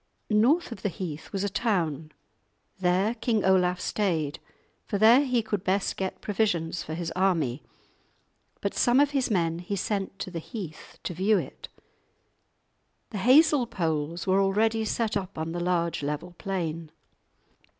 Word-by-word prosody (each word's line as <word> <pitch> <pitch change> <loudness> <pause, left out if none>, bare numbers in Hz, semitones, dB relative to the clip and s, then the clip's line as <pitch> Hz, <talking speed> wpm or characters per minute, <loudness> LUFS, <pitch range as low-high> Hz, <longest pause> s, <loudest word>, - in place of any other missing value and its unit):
North 250 +10 +3
of 200 - -7
the 205 - 0
heath 165 -3 -6
was 195 -1 -2
a - - +1
town; 170 - -1 0.7
there 185 +4 +2
King 225 -3 0
Olaf 180 -1 +3
stayed, 165 -10 -1 0.5
for 200 - -1
there 230 +7 +7
he 250 -4 +1
could 205 -3 -2
best 195 +1 0
get 190 -1 -4
provisions 180 -6 0
for 155 - -5
his 170 0 -4
army. 165 -9 +1 1.0
But - - -1
some 245 +1 +3
of 290 0 +4
his 270 -3 0
men 170 -5 +1
he 180 +3 -4
sent 195 0 -2
to 185 - -5
the 170 - -4
heath, 175 - -8
to - - -3
view 195 +5 +3
it. - - -6 1.4
The 210 - -4
hazel 270 +3 +5
poles 165 -3 -2
were 190 0 +3
already 220 +3 +2
set 220 0 -1
up 195 -2 -3
on 160 +1 -3
the 175 - -3
large 175 -2 0
level 150 +5 -4
plain. 165 -4 -3
190 Hz, 155 wpm, -27 LUFS, 170-220 Hz, 1.4 s, there